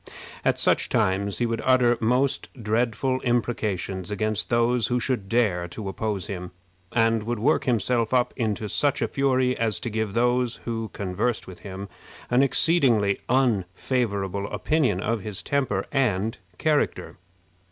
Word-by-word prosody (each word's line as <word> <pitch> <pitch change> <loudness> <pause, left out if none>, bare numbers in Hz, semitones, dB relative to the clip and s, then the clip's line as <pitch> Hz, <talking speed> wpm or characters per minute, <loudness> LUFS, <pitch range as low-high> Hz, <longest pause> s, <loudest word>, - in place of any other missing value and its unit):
At - - +2
such - - +2
times 100 +1 +1
he 120 - +1
would 115 -1 -2
utter 125 -2 +4
most 125 +4 +1
dreadful 115 +4 0
imprecations 105 -6 -1
against 110 +1 -1
those 120 0 +2
who 125 0 +1
should 120 -6 -2
dare 100 -7 +1
to 100 +3 -7
oppose 95 -1 -2
him, 90 -2 -5 0.4
and 115 -1 +2
would 120 +3 -2
work 135 +9 +2
himself 120 -1 +1
up 125 -1 +2
into 110 -2 -1
such 145 +6 +1
a - - +1
fury 130 -2 +1
as 115 -2 0
to 120 -3 -4
give 110 -2 -2
those 120 0 +2
who 115 -2 -3
conversed 100 +5 -2
with 95 - -11
him 100 0 -7 0.4
an 125 +1 +5
exceedingly 130 - +3
unfavorable 100 -4 0
opinion 130 - +1
of 115 0 -1
his 105 -1 -4
temper 130 -9 0
and 110 -6 0 0.2
character. 155 -2 0
115 Hz, 145 wpm, -25 LUFS, 100-125 Hz, 0.4 s, an